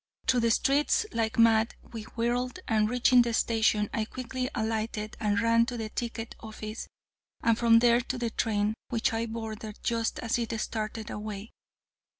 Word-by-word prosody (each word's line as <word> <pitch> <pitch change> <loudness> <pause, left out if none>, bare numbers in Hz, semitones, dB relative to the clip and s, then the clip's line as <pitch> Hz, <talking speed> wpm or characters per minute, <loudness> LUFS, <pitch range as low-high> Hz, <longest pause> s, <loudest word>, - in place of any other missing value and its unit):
Through 255 -1 +3
the 230 0 +2
streets 280 - +2
like 225 -1 -1
mad 225 -1 +4 0.2
we 220 -2 -6
whirled, 240 +2 -1
and, 215 -1 +2
reaching 250 +1 +5
the 235 -1 0
station, 220 -2 +2
I 220 - 0
quickly 255 +2 -4
alighted 220 -1 -2
and 210 0 +1
ran 230 0 +3
to 245 - -4
the 220 -1 -4
ticket 230 0 -4
office, 215 0 -7 0.6
and 230 - +4
from 230 0 +5
there 235 +1 +5
to 255 +1 -4
the 235 -2 -2
train, 210 -1 0 0.2
which 230 -1 0
I 225 +1 -1
boarded 220 -1 -6
just 230 -1 0
as 230 +2 -1
it 230 -1 -2
started 215 0 -4
away. 210 0 -6
230 Hz, 165 wpm, -28 LUFS, 220-235 Hz, 0.6 s, reaching